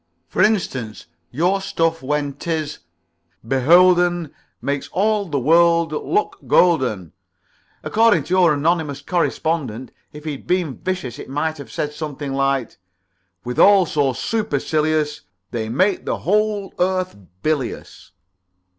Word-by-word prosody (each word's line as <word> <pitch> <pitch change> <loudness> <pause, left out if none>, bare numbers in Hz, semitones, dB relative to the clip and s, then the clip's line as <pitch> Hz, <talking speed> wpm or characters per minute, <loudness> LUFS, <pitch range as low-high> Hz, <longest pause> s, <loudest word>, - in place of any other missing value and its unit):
For - - 0
instance, 135 - 0 0.2
your 180 - 0
stuff 165 -4 -1
when 145 +1 -1
'tis 155 0 -4 0.7
'beholden 175 +4 +4 0.3
Makes 140 0 -3
all 210 +1 +1
the 155 -6 -2
world 165 +3 +4
look 405 - -1
golden,' 125 - +2 0.7
according 220 -7 +3
to 155 - -4
your 180 -3 +5
anonymous 150 -1 0
correspondent. 155 -8 -2 0.2
If 150 0 -11
he'd 150 -3 -6
been 175 -6 -1
vicious 180 -11 -4
he - - -8
might 150 +3 -3
have 140 - -10
said 150 0 -3
something 150 -2 -5
like 135 -2 0
this: - - -26 0.4
' 90 0 -49
withal 190 +10 +5
so 145 -4 0
supercilious 155 - -1 0.3
They 110 -2 -3
make 185 - +1
the - - -1
whole 210 0 0
earth 185 0 0 0.3
bilious.'" 150 -5 -3
155 Hz, 125 wpm, -20 LUFS, 140-180 Hz, 0.7 s, your